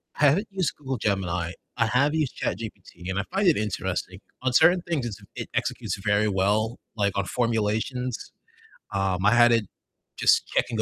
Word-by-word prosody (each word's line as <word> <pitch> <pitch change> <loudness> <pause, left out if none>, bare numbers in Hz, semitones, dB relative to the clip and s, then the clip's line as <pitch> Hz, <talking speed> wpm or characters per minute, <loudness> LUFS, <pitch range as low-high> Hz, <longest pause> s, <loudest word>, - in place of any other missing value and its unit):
I 150 - +3
haven't 180 +10 +3
used 190 -6 -1
Google 135 -3 -4
Gemini, 90 -5 -1 0.3
I 115 - +3
have 140 +6 +2
used 150 -5 -1
ChatGPT, 95 -5 -5
and 95 +1 -1
I - - 0
find 195 0 +1
it 165 - +5
interesting, 95 -2 -3 0.2
on 130 -1 0
certain 175 +7 +6
things 150 -8 -1
it's 105 -4 -5 0.2
it - - -5
executes - - -2
very 105 0 +2
well, 105 +4 +1 0.2
like 100 -2 0
on 100 - +1
formulations, 115 +2 -1 0.6
um, 95 -1 0
I 110 - +6
had 120 0 +6
it 115 -3 +3 0.5
just - - +4
checking 115 -2 0
110 Hz, 170 wpm, -26 LUFS, 100-130 Hz, 0.6 s, certain